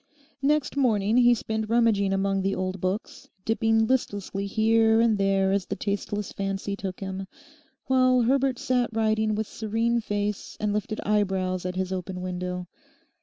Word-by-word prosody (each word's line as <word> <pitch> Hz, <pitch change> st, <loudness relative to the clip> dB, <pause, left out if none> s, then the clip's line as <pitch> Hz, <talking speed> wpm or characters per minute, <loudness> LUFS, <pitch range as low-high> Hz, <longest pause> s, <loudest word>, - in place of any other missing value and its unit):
Next 290 Hz, 0 st, +1 dB
morning 225 Hz, -5 st, +2 dB
he 245 Hz, -1 st, +6 dB
spent 220 Hz, -1 st, -3 dB
rummaging 225 Hz, -4 st, +3 dB
among 195 Hz, 0 st, +1 dB
the 195 Hz, +1 st, 0 dB
old 185 Hz, 0 st, -3 dB
books, 185 Hz, +3 st, -4 dB, 0.2 s
dipping 225 Hz, 0 st, +2 dB
listlessly 205 Hz, -5 st, -1 dB
here 225 Hz, +1 st, +3 dB
and 230 Hz, -1 st, +4 dB
there 195 Hz, -1 st, +2 dB
as 195 Hz, -2 st, 0 dB
the -, -, -3 dB
tasteless 205 Hz, +1 st, -3 dB
fancy 195 Hz, 0 st, -3 dB
took 190 Hz, -1 st, -6 dB
him, 190 Hz, 0 st, -5 dB, 0.6 s
while 255 Hz, -1 st, +4 dB
Herbert 265 Hz, +1 st, +2 dB
sat 250 Hz, -1 st, 0 dB
writing 220 Hz, -1 st, +1 dB
with 220 Hz, +1 st, -1 dB
serene 225 Hz, +3 st, -1 dB
face 205 Hz, -1 st, -3 dB
and 210 Hz, -1 st, 0 dB
lifted 210 Hz, +1 st, -2 dB
eyebrows 190 Hz, -3 st, 0 dB
at 180 Hz, -, -4 dB
his 190 Hz, 0 st, -2 dB
open 185 Hz, 0 st, -4 dB
window. 180 Hz, 0 st, -4 dB
210 Hz, 155 wpm, -26 LUFS, 195-225 Hz, 0.6 s, he